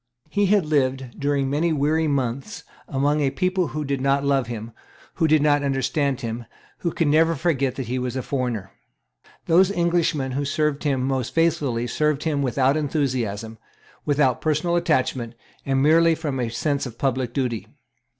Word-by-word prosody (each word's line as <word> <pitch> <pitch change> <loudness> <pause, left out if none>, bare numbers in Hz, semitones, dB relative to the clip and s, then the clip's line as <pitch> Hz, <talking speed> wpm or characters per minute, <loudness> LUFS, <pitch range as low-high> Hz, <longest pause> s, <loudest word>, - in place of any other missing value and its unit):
He 205 -1 +2
had 200 -3 +3
lived 135 -4 -1
during 140 -1 0
many 150 +5 +1
weary 155 +2 +1
months 135 -2 -2 0.2
among 145 +2 +1
a 140 - +2
people 185 +3 0
who 150 0 -4
did 140 -1 -2
not 140 +1 +2
love 135 -3 +2
him, 115 -1 -6 0.5
who 165 - +3
did 155 -1 +4
not 145 -1 +3
understand 140 0 0
him, 115 0 -5 0.3
who 170 - -1
could 165 - 0
never 160 +3 +4
forget 140 -5 0
that 135 - -4
he 125 +3 -2
was 125 0 -3
a 130 - -2
foreigner. 120 -8 -3 0.7
Those 180 +3 +5
Englishmen 170 -7 0
who 140 +3 -1
served 150 +1 -1
him 135 -3 +1
most 130 -2 -2
faithfully 145 -8 +1
served 150 +4 0
him 150 -3 0
without 135 +1 +2
enthusiasm, 120 -8 -2 0.4
without 140 -4 +2
personal 155 +3 +1
attachment, 130 -8 0 0.3
and 135 0 +2
merely 165 +2 +5
from 150 -5 -3
a 120 -2 -1
sense 140 +4 -1
of 115 -2 -11
public 130 -3 -1
duty. 125 -4 -2
140 Hz, 170 wpm, -23 LUFS, 130-155 Hz, 0.7 s, Those